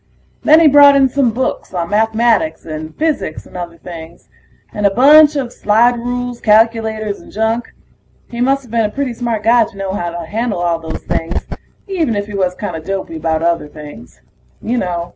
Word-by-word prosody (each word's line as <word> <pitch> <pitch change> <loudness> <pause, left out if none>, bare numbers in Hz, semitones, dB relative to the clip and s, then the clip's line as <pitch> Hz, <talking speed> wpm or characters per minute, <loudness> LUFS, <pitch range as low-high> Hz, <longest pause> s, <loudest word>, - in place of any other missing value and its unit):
Then 310 +2 +6
he 330 - +6
brought 285 0 +7
in 270 -1 +4
some 270 -1 +1
books 230 -4 -3
on 170 0 -3
mathematics 225 +7 +1
and 155 0 -7
physics 310 - -2
and - - -17
other 170 -1 -6
things, 165 0 -11 0.4
and 210 -1 +1
a - - +3
bunch 295 +8 +6
of 255 -4 -3
slide 230 +4 +3
rules, 245 0 -4
calculators, 220 -1 +1
and - - -15
junk. 220 +3 -2 0.6
He 235 0 -5
musta 270 +1 +1
been 230 -1 0
a - - -1
pretty 275 -3 -2
smart 230 -2 -3
guy 230 +1 +4
to 200 - -14
know 195 -1 -4
how 175 -3 -3
to 170 0 -6
handle 220 +3 -2
all 170 -1 0
those 160 -1 -7
things, 165 +2 -2 0.5
even 330 - -1
if 205 0 -2
he 210 - -10
was 185 -2 -1
kinda 180 -6 -5
dopey 190 -1 -5
about 160 0 -1
other 170 -2 0
things. 145 - -12 0.4
You 240 +2 -2
know 175 -3 -3
215 Hz, 190 wpm, -16 LUFS, 175-245 Hz, 0.6 s, brought